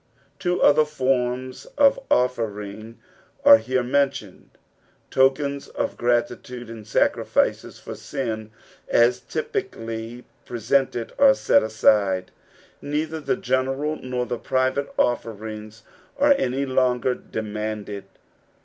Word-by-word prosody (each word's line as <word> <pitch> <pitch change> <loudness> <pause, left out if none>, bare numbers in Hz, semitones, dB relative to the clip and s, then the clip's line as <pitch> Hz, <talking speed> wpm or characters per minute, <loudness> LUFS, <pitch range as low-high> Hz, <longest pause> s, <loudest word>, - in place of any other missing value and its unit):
'^ - - -40
Two 180 0 0
other 150 +1 +6
forms 130 -3 -1
of 280 -1 +5
offering 110 -3 -1 0.5
are 110 - +9
here 130 +3 -1
mentioned; 135 -6 -1 0.6
tokens 140 +1 +2
of - - -3
gratitnde 120 0 -1
and 110 -2 -9
sacrillces 110 - +1
for - - -8
sin 110 -6 -4 0.4
aa 120 +1 +5 0.2
typically 115 +2 -4 0.2
pre< 120 - -6
sented 120 0 0
are 275 -1 +7
set - - +3
aside 100 -4 +2 0.3
\ - - -30
neither 155 +2 -1
the 155 - -1
general 135 -3 -1
nor 125 -1 -3
the 120 -1 -4
private 130 +2 0
offering 110 -2 -2 0.5
are 285 +1 +5
any 135 - -1
longer 130 -1 +1
demanded. 105 -3 -5
125 Hz, 115 wpm, -23 LUFS, 110-135 Hz, 0.6 s, are